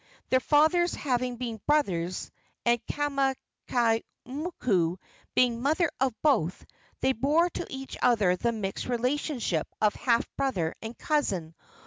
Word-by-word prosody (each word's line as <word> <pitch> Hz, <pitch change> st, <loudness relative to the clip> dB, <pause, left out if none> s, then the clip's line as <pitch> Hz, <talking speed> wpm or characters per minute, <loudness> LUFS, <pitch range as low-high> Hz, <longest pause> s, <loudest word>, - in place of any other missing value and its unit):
Their 260 Hz, -, +5 dB
fathers 315 Hz, +6 st, +3 dB
having 250 Hz, -2 st, -1 dB
been 230 Hz, -3 st, -5 dB
brothers, 185 Hz, -, 0 dB, 0.3 s
and 235 Hz, -1 st, +3 dB
Kamakaimoku 255 Hz, -, -1 dB, 0.4 s
being 250 Hz, -1 st, +4 dB
the -, -, -7 dB
mother 310 Hz, +4 st, +2 dB
of 260 Hz, -3 st, 0 dB
both, 185 Hz, -, +2 dB, 0.4 s
they 265 Hz, -, +3 dB
bore 300 Hz, +8 st, +2 dB
to -, -, -5 dB
each 270 Hz, 0 st, -6 dB
other 215 Hz, -7 st, +4 dB
the 235 Hz, +6 st, 0 dB
mixed 200 Hz, -4 st, -4 dB
relationship 250 Hz, -, -1 dB
of 210 Hz, -1 st, +3 dB
half 235 Hz, -2 st, +1 dB
brother 185 Hz, -13 st, 0 dB
and 225 Hz, +2 st, -7 dB
cousin. 195 Hz, -, 0 dB
250 Hz, 125 wpm, -28 LUFS, 220-285 Hz, 0.4 s, Their